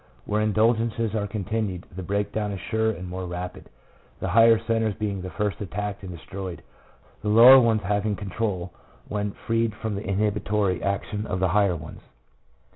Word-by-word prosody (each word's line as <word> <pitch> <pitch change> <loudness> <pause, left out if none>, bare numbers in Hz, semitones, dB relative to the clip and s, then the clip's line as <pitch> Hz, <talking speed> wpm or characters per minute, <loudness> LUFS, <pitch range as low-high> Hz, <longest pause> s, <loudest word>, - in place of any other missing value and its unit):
Where 105 +1 0
in 110 0 +1
dulgences 115 0 +1
are 105 -2 -1
continued 100 -2 -3
the 95 - -5
breakdown 100 +2 -2
is 100 - -5
surer 110 +4 0
and 90 -4 -4
more 90 0 -5
rapid, 90 +1 -6 0.5
the 95 - -2
higher 115 +3 +6
centres 115 -2 0
being 100 -3 -3
the 95 - -5
first 105 +1 -2
attacked 105 +1 -4
and 95 -2 -7
destroyed, 90 +1 -7 0.6
the 105 - -2
low 115 +3 +7
r - - +12
er 135 - +10
ones 115 -3 +2
having 105 +2 0
control 95 -3 -3 0.3
when 105 -1 -2
freed 115 -1 +1
from 110 0 -4
the 100 - -3
inhibitory 105 -2 0
action 105 +2 -2
of 90 - -2
the 95 0 +2
higher 100 -1 +3
ones. 80 - -9
105 Hz, 180 wpm, -25 LUFS, 95-110 Hz, 0.6 s, r